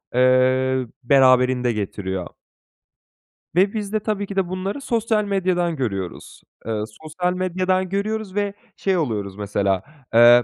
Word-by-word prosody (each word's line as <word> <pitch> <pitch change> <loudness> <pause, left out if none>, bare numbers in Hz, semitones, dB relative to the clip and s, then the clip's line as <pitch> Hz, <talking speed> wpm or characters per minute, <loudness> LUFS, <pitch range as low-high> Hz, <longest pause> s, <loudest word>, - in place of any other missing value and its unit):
eee, 130 0 +3 0.2
beraberinde 125 -1 +4
getiriyor. 95 -3 -3 1.3
Ve 195 +2 +4
biz 210 -1 -4
de 215 - +2
tabii 210 -1 -2
ki 200 - -6
de 190 -2 0
bunları 190 +8 -3
sosyal 225 -3 +1
medyadan 180 -4 0
görüyoruz. 100 - -4 0.2
Eee, 110 -1 -2 0.2
sosyal 180 +3 -1
medyadan 185 0 0
görüyoruz 200 0 -2
ve 205 -1 0 0.2
şey 190 -2 +1
oluyoruz 105 - -2
mesela. 100 -2 0 0.3
Eee, 120 +1 +8
160 Hz, 125 wpm, -22 LUFS, 120-195 Hz, 1.3 s, Eee